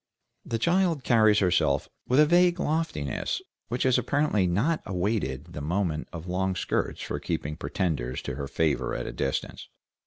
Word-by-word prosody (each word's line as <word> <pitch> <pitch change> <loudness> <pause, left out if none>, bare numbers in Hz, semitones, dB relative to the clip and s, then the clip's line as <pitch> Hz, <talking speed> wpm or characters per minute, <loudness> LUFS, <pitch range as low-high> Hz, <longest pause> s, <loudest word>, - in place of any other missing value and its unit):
The 115 - -2
child 170 +1 +2
carries 110 -4 +5
herself 90 -4 +2 0.2
with 130 +3 +3
a 150 - +8
vague 175 +2 +4
loftiness, 150 - -1 0.3
which 125 +2 -1
has 130 -1 +4
apparently 140 -10 +1
not 125 - +1
awaited 95 - -2
the 75 - -5
moment 85 0 -1
of 85 -1 -7
long 95 +1 0
skirts - - -2
for - - -3
keeping 75 +1 -3
pretenders 80 - -2
to - - -4
her 70 +1 -4
favor 80 0 0
at - - -3
a - - -5
distance. 65 - -3
95 Hz, 160 wpm, -27 LUFS, -, 0.3 s, a